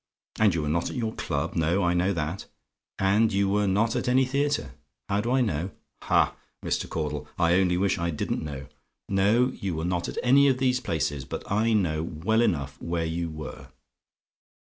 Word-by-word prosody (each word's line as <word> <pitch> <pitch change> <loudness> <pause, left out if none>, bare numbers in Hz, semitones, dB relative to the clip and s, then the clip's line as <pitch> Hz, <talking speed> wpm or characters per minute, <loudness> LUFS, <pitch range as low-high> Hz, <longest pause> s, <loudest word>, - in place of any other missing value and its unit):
And 105 -5 +4
you 80 - -1
were - - -2
not 85 +3 0
at - - -7
your 115 -3 -2
Club: 70 -5 -2
no, 85 +4 +1
I 85 0 +2
know 90 +2 +2
that. 85 +1 -3 0.5
And 105 +4 +3
you 100 0 +2
were 100 +1 +1
not 110 +4 +2
at - - -1
any 130 +1 +4
theatre. 140 - -1 0.4
"HOW 100 0 +1
DO 115 - -3
I 130 0 +3
KNOW? 95 -5 -1 0.3
"Ha, - - +3 0.3
Mr. - - -1
Caudle! 75 -2 -3
I 85 -1 +3
only 90 -2 +2
wish 95 0 +1
I 85 0 0
didn't 75 - -2
know. 70 -3 -6 0.4
No; 105 +6 +3
you 95 -4 -4
were 80 +1 -3
not 90 -1 -1
at - - -7
any 140 +3 +6
of 130 -2 +3
these 130 -1 +2
places; 80 - -2
but 65 - -6
I 110 +3 +2
know 85 -7 +1
well 85 +8 0
enough 75 - -1
where 85 -1 -2
you 85 +1 -2
were. 75 -4 -8
95 Hz, 195 wpm, -26 LUFS, 80-110 Hz, 0.5 s, any